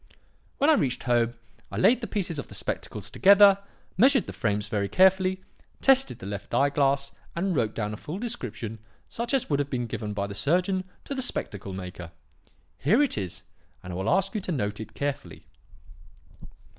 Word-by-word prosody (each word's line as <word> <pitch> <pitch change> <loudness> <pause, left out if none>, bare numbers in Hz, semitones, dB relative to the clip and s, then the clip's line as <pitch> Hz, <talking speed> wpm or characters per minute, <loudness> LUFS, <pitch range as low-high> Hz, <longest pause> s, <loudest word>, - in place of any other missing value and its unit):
"When 285 +3 +4
I - - +7
reached 130 - 0
home, 120 -1 +1 0.4
I - - -5
laid 250 +2 +4
the 230 - -4
pieces 175 -7 -2
of - - -6
the - - -8
spectacles - - -5
together, 200 0 +7 0.4
measured 265 0 +5
the - - -7
frames 105 -1 -1
very 100 -1 -1
carefully, 190 0 +3 0.4
tested 270 0 +3
the - - -10
left 100 0 -5
eye 140 +1 +3
glass, 140 -1 +1 0.2
and 180 +1 0
wrote 110 -5 0
down 105 -1 -2
a - - -6
full 155 - -6
description 120 - -4 0.3
such 235 +1 -3
as 270 -3 +1
would 145 - +2
have 140 -1 -1
been 125 -3 -2
given 110 -2 -4
by 100 -1 -2
the 100 - -6
surgeon 180 - +1 0.2
to - - -5
the 265 - -2
spectacle 100 - +1
maker. 90 -2 -7 0.7
Here 215 - +4
it 285 - 0
is, 95 -2 -5 0.4
and 90 - -7
I - - -4
will 95 +4 -1
ask 195 +1 +1
you 215 - -2
to 185 - -3
note 105 -9 -2
it 110 -1 -9
carefully. 140 -1 -4
140 Hz, 190 wpm, -26 LUFS, -, 0.7 s, I